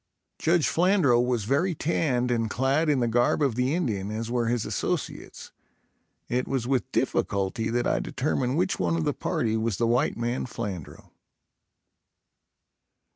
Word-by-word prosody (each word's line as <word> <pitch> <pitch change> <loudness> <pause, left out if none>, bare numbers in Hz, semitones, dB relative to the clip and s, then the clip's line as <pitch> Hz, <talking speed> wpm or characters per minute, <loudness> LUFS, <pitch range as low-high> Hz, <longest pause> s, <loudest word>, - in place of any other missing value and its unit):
Judge 165 -1 +2
Flandrau 175 -8 +3
was 125 -3 0
very 150 - +1
tanned 130 -6 0
and 115 -2 0
clad 135 +6 +1
in 140 -4 +2
the 120 - +2
garb 120 +5 +2
of 135 -4 +2
the 125 +5 0
Indian 105 - -1
as 110 +2 -4
were 120 -1 0
his 120 -1 0
associates; - - -4 0.8
it 125 +1 -1
was 130 -3 -1
with 130 -1 -1
difficulty 100 +3 0
that 120 +1 0
I - - +1
determined 130 0 -1
which 185 +2 0
one 85 -2 +1
of 80 - -1
the - - 0
party 110 -1 -1
was 110 -3 -1
the 120 - +1
white 120 +2 +1
man 120 +2 -2
Flandrau. 100 - -7
120 Hz, 155 wpm, -26 LUFS, 115-140 Hz, 0.8 s, Flandrau